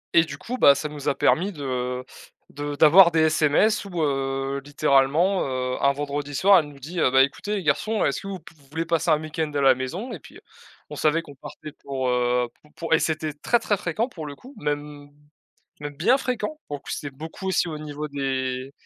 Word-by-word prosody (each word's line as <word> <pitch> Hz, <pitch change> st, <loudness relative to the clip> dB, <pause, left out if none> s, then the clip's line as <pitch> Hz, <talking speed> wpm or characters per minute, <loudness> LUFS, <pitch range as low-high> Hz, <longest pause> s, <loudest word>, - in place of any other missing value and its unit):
et 165 Hz, -, +7 dB
du 145 Hz, -3 st, -8 dB
coup, 250 Hz, -, -6 dB
bah, 140 Hz, -, +7 dB
ça 150 Hz, +2 st, -4 dB
nous 150 Hz, -2 st, -3 dB
a -, -, 0 dB
permis 190 Hz, +5 st, +2 dB
de 125 Hz, -5 st, -3 dB, 0.5 s
de 145 Hz, 0 st, -5 dB
d'avoir 165 Hz, +5 st, +8 dB
des 165 Hz, -1 st, +2 dB
SMS 155 Hz, +7 st, +3 dB
où, 175 Hz, -5 st, -3 dB
heu, 135 Hz, -1 st, -1 dB
littéralement, 145 Hz, +6 st, +2 dB
heu, 130 Hz, -1 st, -2 dB
un 140 Hz, -, +4 dB
vendredi 145 Hz, 0 st, -4 dB
soir, 195 Hz, +6 st, +6 dB
elle 155 Hz, -, -3 dB
nous 145 Hz, -1 st, -13 dB
dit: 165 Hz, +6 st, -6 dB
«Heu, 145 Hz, -, +4 dB
bah, 130 Hz, +1 st, +6 dB
écoutez 205 Hz, +9 st, -3 dB
les 195 Hz, -, -3 dB
garçons, 210 Hz, +9 st, +1 dB
est-ce -, -, -1 dB
que -, -, -8 dB
vous 195 Hz, -1 st, -5 dB
pouv 165 Hz, +1 st, -16 dB
vous 140 Hz, -, -23 dB
voulez 160 Hz, +3 st, -3 dB
passer 165 Hz, 0 st, 0 dB
un 155 Hz, -1 st, +4 dB
week-end 155 Hz, 0 st, -3 dB
à 140 Hz, -, +1 dB
la 135 Hz, -1 st, +6 dB
maison?» 130 Hz, -, -5 dB
et -, -, -7 dB
puis, -, -, -15 dB, 0.5 s
on -, -, -5 dB
savait 160 Hz, +2 st, +1 dB
qu'on 145 Hz, -, -12 dB
partait 150 Hz, +2 st, -10 dB
pour, 135 Hz, -2 st, -4 dB
heu, 125 Hz, 0 st, +1 dB
pour 150 Hz, -, -23 dB
pour 165 Hz, -1 st, -2 dB
et 160 Hz, -, +5 dB
c'était 155 Hz, -1 st, -1 dB
très, 150 Hz, +11 st, +1 dB
très, 220 Hz, -3 st, 0 dB
fréquent 185 Hz, +5 st, -2 dB
pour 165 Hz, -, -8 dB
le 145 Hz, -, -7 dB
coup, 260 Hz, -, -15 dB
même 145 Hz, -1 st, -4 dB, 0.7 s
même 145 Hz, 0 st, -7 dB
bien 225 Hz, -, +3 dB
fréquent, 255 Hz, +2 st, -3 dB
pour 145 Hz, -, -5 dB
le -, -, -26 dB
coup, -, -, -10 dB
c'était 145 Hz, -2 st, -5 dB
beaucoup 160 Hz, +6 st, -8 dB
aussi 190 Hz, -2 st, +1 dB
au 155 Hz, -2 st, -5 dB
niveau 150 Hz, 0 st, -6 dB
des 130 Hz, -2 st, -3 dB
150 Hz, 225 wpm, -24 LUFS, 140-170 Hz, 0.7 s, d'avoir